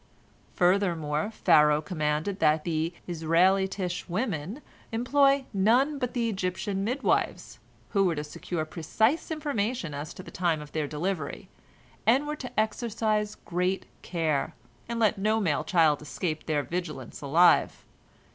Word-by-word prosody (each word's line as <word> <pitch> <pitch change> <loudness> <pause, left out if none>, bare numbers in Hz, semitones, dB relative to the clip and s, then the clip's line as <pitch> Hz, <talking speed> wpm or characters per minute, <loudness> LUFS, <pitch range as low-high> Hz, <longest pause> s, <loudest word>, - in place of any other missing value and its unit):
Furthermore, 175 -3 +1
Pharaoh 150 -8 +4
commanded 155 +3 -1
that 155 0 +3
the 165 -1 -1
Israelitish 180 +3 +1
women 200 - -3 0.3
employ 275 +4 +3
none 245 +9 +3
but 250 0 -3
Egyptian 195 -3 -1
midwives, 250 +6 -1 0.3
who 200 -2 +2
were 175 -3 +1
to 150 - -3
secure 155 +2 -4
precise 220 - 0
information 250 - -2
as 145 +2 -5
to 185 - -9
the - - -11
time 170 -3 0
of 150 -1 -10
their 155 -2 -2
delivery, 160 +1 -4 0.5
and 255 +7 +3
were 300 +1 -3
to 255 -6 -5
exercise 215 -1 0
great 180 +2 -1 0.2
care, 160 -5 -1 0.3
and 235 0 -2
let 220 -2 +2
no 215 +3 +2
male 165 -9 0
child 165 -7 +3
escape 155 +1 -4
their 150 -2 +1
vigilance 150 -4 -5
alive. 165 +5 +3
185 Hz, 130 wpm, -27 LUFS, 155-220 Hz, 0.5 s, Pharaoh